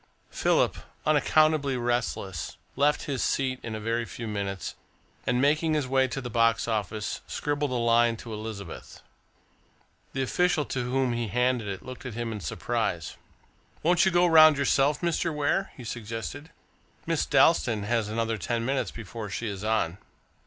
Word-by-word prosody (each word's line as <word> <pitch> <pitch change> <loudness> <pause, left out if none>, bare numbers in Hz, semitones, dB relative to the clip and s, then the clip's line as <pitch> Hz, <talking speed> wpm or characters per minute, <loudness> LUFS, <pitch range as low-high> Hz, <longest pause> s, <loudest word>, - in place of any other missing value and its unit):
Philip, - - +2 0.3
unaccountably 155 -2 +3
restless, 120 -8 -2 0.2
left 145 +1 +2
his 140 -4 -2
seat 130 -2 0
in 110 -2 -5
a - - -4
very 115 +2 -1
few 115 0 -7
minutes, 100 -3 -3 0.5
and, 125 - +2
making 155 +3 +2
his 145 -4 0
way 130 0 +3
to 130 +2 -4
the 125 - -5
box 115 0 +2
office, 105 -1 -2
scribbled 145 0 -1
a 130 - -2
line 115 -1 +3
to 115 0 -8
Elizabeth. 105 -5 -8 1.1
The 135 - 0
official 175 +2 +1
to 125 -2 -3
whom 130 -1 +1
he 120 -1 -2
handed 125 +1 +1
it 95 -2 -5
looked 130 0 -8
at 120 - -7
him 120 -1 -3
in 105 - -4
surprise. - - -2 0.7
"Won't 175 +2 +4
you 190 - +4
go 175 -1 +4
round 155 -3 +7
yourself, 140 +1 +2
Mr. 170 -1 0
Ware?" 150 +6 0
he 125 - -9
suggested. 115 +6 -6 0.6
"Miss 165 -2 0
Dalstan 135 -6 +4
has 110 0 0
another 115 0 -1
ten 115 +4 -1
minutes 135 +1 0
before 110 -1 -7
she 115 - -3
is 100 -1 -5
on." 105 -5 0
125 Hz, 160 wpm, -27 LUFS, 110-145 Hz, 1.1 s, round